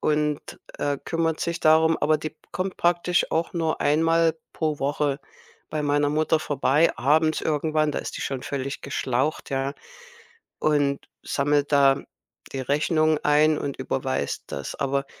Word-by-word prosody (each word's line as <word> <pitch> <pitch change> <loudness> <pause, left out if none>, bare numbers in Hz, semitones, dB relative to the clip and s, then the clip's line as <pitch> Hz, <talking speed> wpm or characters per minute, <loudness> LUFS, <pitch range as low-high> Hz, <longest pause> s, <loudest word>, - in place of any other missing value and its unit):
und, 150 -1 +1 0.4
äh, 145 -1 0
kümmert 165 -1 -1
sich 170 0 -2
darum. 160 +1 +5
Aber 155 +1 +2
die 155 0 -6 0.2
kommt 185 +1 -3
praktisch 175 0 +1
auch 165 +1 0
nur 165 -2 -1
einmal 165 +2 +3
pro 155 -2 -1
Woche 140 0 0 0.5
bei 155 -1 -2
meiner 145 0 +2
Mutter 155 +1 +2
vorbei, 145 +3 +2
abends 155 +3 +2
irgendwann. 155 0 +1
Da - - -2
ist - - -6
die - - -4
schon 135 -2 -3
völlig 140 0 -4
geschlaucht, 135 +2 -1
ja 135 +1 -1 0.9
und 145 -2 +1
sammelt 145 +1 0
da 140 -1 +4 0.5
die 135 - -3
Rechnungen 155 +3 +2
ein 150 +1 +4
und 140 -1 -4
überweist 130 - -2
das. 70 - -5
Aber 140 0 -1
150 Hz, 145 wpm, -25 LUFS, 140-160 Hz, 0.9 s, darum